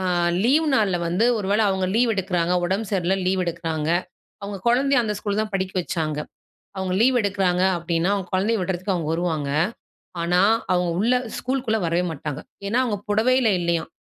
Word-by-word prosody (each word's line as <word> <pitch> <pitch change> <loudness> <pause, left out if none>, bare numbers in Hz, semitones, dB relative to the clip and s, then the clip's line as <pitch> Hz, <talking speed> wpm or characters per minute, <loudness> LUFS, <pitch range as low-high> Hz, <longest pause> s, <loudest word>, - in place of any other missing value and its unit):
ஆ - - -3 0.4
leave 300 +7 +3
நாள்ல 205 -7 +2
வந்து 180 +6 +1
ஒருவேளை 205 +2 +1
அவங்க 190 -1 0
லீவ் 235 0 +3
எடுக்கிறாங்க, 180 -3 0
உடம்பு 195 +4 -1
சரியில்ல 190 0 +1
லீவ் 185 0 +1
எடுக்கிறாங்க. 165 -2 -3 0.5
அவங்க 200 0 -5
குழந்தையை 275 +4 +3
அந்த 210 - -1
ஸ்கூல் 205 0 -2
தான் 215 -2 -5
படிக்க 190 -1 -2
வைச்சாங்க. 155 -3 -2 0.6
அவங்க 190 -1 -2
லீவ் 255 +2 +4
எடுக்கிறாங்க 190 -3 +1 0.2
அப்படின்னா, 170 +1 -1
அவங்க 195 -3 -4
குழந்தையை 205 +5 +1
விடுறதுக்கு 185 +1 -2
அவங்க 165 -3 -3
வருவாங்க. 165 -4 -1 0.7
ஆனா, 175 +1 +2 0.3
அவங்க 180 -1 +1
உள்ள 230 +5 +2 0.2
ஸ்கூல்க்குள்ளே 250 -4 -1
வரவே 170 +2 +1
மாட்டாங்க. 150 -1 -5 0.2
ஏன்னா, 210 +4 0
அவங்க 220 -5 -1
புடவையில 235 +3 +3
இல்லையாம். 170 -1 -1
190 Hz, 165 wpm, -23 LUFS, 170-215 Hz, 0.7 s, லீவ்